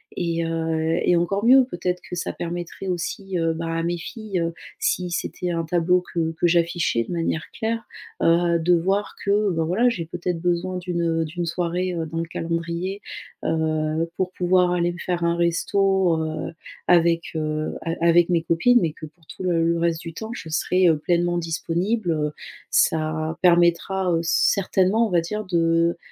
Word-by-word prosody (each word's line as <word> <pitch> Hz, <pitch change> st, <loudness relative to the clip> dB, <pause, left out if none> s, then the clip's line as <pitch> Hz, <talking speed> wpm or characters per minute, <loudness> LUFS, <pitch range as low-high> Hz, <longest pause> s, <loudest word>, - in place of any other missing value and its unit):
Et 170 Hz, -1 st, -1 dB
heu, 160 Hz, 0 st, 0 dB
et 175 Hz, -, +3 dB
encore 195 Hz, +5 st, 0 dB
mieux 260 Hz, +2 st, +7 dB
peut-être 180 Hz, -2 st, -2 dB
que -, -, -4 dB
ça 175 Hz, -, -3 dB
permettrait 175 Hz, +2 st, -5 dB
aussi, 185 Hz, +1 st, -3 dB
heu, 165 Hz, -1 st, +1 dB
bah, 165 Hz, +1 st, -4 dB
à 165 Hz, -, -1 dB
mes 175 Hz, +1 st, -1 dB
filles, 195 Hz, +2 st, -5 dB
heu, 165 Hz, 0 st, -1 dB, 0.3 s
si 180 Hz, -1 st, 0 dB
c'était 180 Hz, +1 st, -3 dB
un 165 Hz, -1 st, -1 dB
tableau 175 Hz, +2 st, +2 dB
que 165 Hz, -1 st, 0 dB
que 165 Hz, +2 st, +1 dB
j'affichais 170 Hz, -7 st, +1 dB
de -, -, -9 dB
manière 165 Hz, -2 st, -1 dB
claire, 225 Hz, +1 st, -3 dB, 0.4 s
heu, 170 Hz, 0 st, +3 dB
de 170 Hz, +2 st, +2 dB
voir 195 Hz, +4 st, 0 dB
que 205 Hz, 0 st, +2 dB
bah, 165 Hz, -2 st, 0 dB
voilà 210 Hz, +9 st, +3 dB
j'ai 175 Hz, -9 st, -3 dB
peut-être 175 Hz, 0 st, -3 dB
besoin 180 Hz, +1 st, 0 dB
d'une, 180 Hz, -1 st, -3 dB
heu 165 Hz, -1 st, +1 dB
d'une 170 Hz, +3 st, -4 dB
soirée, 175 Hz, +2 st, -1 dB
heu, 165 Hz, -1 st, -2 dB
dans 165 Hz, +1 st, -4 dB
le 165 Hz, -, 0 dB
calendrier, 170 Hz, +4 st, -3 dB, 0.4 s
heu, 160 Hz, 0 st, 0 dB
pour 185 Hz, -1 st, -1 dB
pouvoir 180 Hz, 0 st, +2 dB
aller 175 Hz, 0 st, +1 dB
me -, -, -10 dB
faire 175 Hz, -1 st, -2 dB
un 170 Hz, 0 st, +2 dB
resto, 185 Hz, +1 st, +2 dB
heu, 155 Hz, +1 st, -4 dB, 0.3 s
avec 170 Hz, -1 st, +4 dB
heu 155 Hz, 0 st, -2 dB
a 165 Hz, -, -3 dB
avec 170 Hz, +1 st, +4 dB
mes 170 Hz, -2 st, +2 dB
copines. 240 Hz, +10 st, +4 dB
Mais 160 Hz, -3 st, 0 dB
que 155 Hz, -, -9 dB
pour 155 Hz, +2 st, -24 dB
tout -, -, -8 dB
le 170 Hz, -2 st, +1 dB
le -, -, -1 dB
reste 165 Hz, -1 st, 0 dB
du 165 Hz, -, -7 dB
temps 220 Hz, +7 st, -6 dB
je 180 Hz, -8 st, -8 dB
serai, 180 Hz, +3 st, +2 dB
heu, 160 Hz, -2 st, +4 dB
pleinement 175 Hz, +2 st, +1 dB
disponible, 175 Hz, +4 st, -1 dB
heu, 150 Hz, -1 st, -1 dB, 0.4 s
ça 155 Hz, 0 st, +1 dB
permettra, 175 Hz, +2 st, +3 dB
heu, 165 Hz, -, +1 dB
certainement 195 Hz, +5 st, +2 dB
on -, -, -2 dB
va 175 Hz, -, +4 dB
dire 210 Hz, +6 st, -3 dB
de 170 Hz, -1 st, +2 dB
170 Hz, 185 wpm, -23 LUFS, 165-180 Hz, 0.4 s, mieux